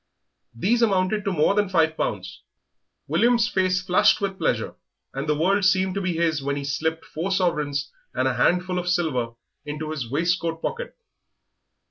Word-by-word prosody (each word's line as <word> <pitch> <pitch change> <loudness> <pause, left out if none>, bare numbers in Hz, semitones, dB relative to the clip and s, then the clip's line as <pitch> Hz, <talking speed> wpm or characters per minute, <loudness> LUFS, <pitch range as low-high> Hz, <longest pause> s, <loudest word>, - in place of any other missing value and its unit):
These 225 - +1
amounted 200 -1 +2
to 200 - 0
more 165 +2 +3
than 205 -1 +1
five 160 -3 +2
pounds. 95 - -4 0.7
William's 230 - +3
face 185 -4 +1
flushed 180 0 +4
with 195 -1 -3
pleasure, - - 0 0.4
and 135 +3 -4
the 150 - +2
world 195 +5 +2
seemed 190 0 +3
to 200 - -2
be 185 -2 -1
his 165 -3 +1
when 140 +1 -2
he 140 - -4
slipped 160 +3 -2
four 165 +5 -4
sovereigns 150 -7 0 0.2
and - - +1
a - - +1
handful 180 0 +1
of 180 0 -3
silver 145 -10 0 0.3
into 150 +1 -5
his 135 -7 -4
waistcoat 165 +3 0
pocket. 485 - -4
175 Hz, 165 wpm, -24 LUFS, 150-190 Hz, 0.7 s, flushed